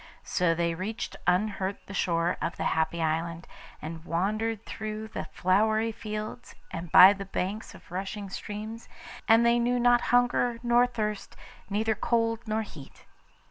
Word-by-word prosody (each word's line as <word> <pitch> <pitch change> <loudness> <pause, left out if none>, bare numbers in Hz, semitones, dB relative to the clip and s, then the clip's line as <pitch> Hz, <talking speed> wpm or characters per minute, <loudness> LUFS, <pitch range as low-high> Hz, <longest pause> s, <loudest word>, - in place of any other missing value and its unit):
So 180 -2 +1
they 170 0 0
reached 195 +7 -4
unhurt 195 +1 0
the 200 - -9
shore 170 -2 +1
of 170 - -2
the - - -2
Happy 160 +1 0
Island, 165 +1 -2 0.4
and 160 +1 -6
wandered 210 +6 -1
through 215 0 -5
the - - -5
flowery 215 +4 +1
fields 215 +2 -6 0.2
and 165 -1 -6
by 190 +2 +10
the 200 -1 -7
banks 195 +3 -4
of - - -17
rushing 195 +2 -4
streams, 215 +3 -7 0.4
and 225 +1 +6
they 235 0 +4
knew 245 +1 +1
not 245 0 +4
hunger 245 -1 +3
nor 240 +1 +4
thirst; 215 -4 -4 0.3
neither 220 +2 +1
cold 230 0 0
nor 220 +1 0
heat. 150 -9 -13
210 Hz, 150 wpm, -28 LUFS, 180-225 Hz, 0.4 s, by